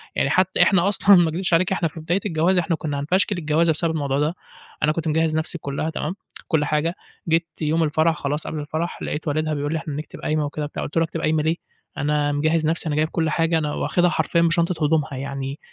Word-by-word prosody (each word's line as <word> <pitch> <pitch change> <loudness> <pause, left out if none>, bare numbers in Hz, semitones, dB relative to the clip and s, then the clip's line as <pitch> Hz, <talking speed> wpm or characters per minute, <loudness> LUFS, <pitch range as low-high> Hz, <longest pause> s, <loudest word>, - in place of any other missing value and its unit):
يعني - - +1
حتى 185 0 +2
إحنا 190 -1 +3
أصلًا 200 0 +6
ما 170 -2 +4
اكدبش 175 +2 -2
عليك 180 +3 +3
إحنا 170 -3 +1
في 160 - -9
بداية 170 +4 0
الجواز 175 0 +2
إحنا 170 0 0
كنا 145 -3 -3
هنفشكل 185 +6 +1
الجوازة 160 +1 +2
بسبب 165 +1 +1
الموضوع 140 -3 -1
ده، 150 +4 0 0.5
أنا 150 - +4
كنت 160 +1 -3
مجهّز 160 0 +1
نفسي 160 +2 -2
كُلّها 145 +1 -3
تمام، 160 +3 -3 0.3
كُلّ 155 -3 +1
حاجة، 155 +4 0 0.3
جيت 165 +1 +2
يوم 160 +2 +1
الفرح 160 +1 +2
خلاص 145 +2 -2
قبل 155 - -4
الفرح 155 +3 -4
لقيت 155 +2 -4
والدها 155 +1 0
بيقول 145 +1 -2
لي - - 0
إحنا 150 - -6
نكتب 150 +1 -7
قايمة 155 -1 0
وكده 150 +1 -4
وبتاع، 145 - -4
قُلت 145 - -5
له 165 - +4
أكتب 165 0 -4
قايمة 155 -1 +1
ليه؟ 160 +1 +1 0.4
أنا 145 0 +1
مجهّز 155 +2 +1
نفسي 165 +1 0
أنا 150 - -1
جايب 155 +1 +1
كل 160 -2 0
حاجة، 165 +1 +1
أنا 150 -2 -1
واخدها 175 0 +1
حرفيًا 170 0 +1
بشنطة 170 -1 +1
هدومها، 155 -1 +1
يعني 135 +1 -5
160 Hz, 225 wpm, -22 LUFS, 150-170 Hz, 0.5 s, أصلًا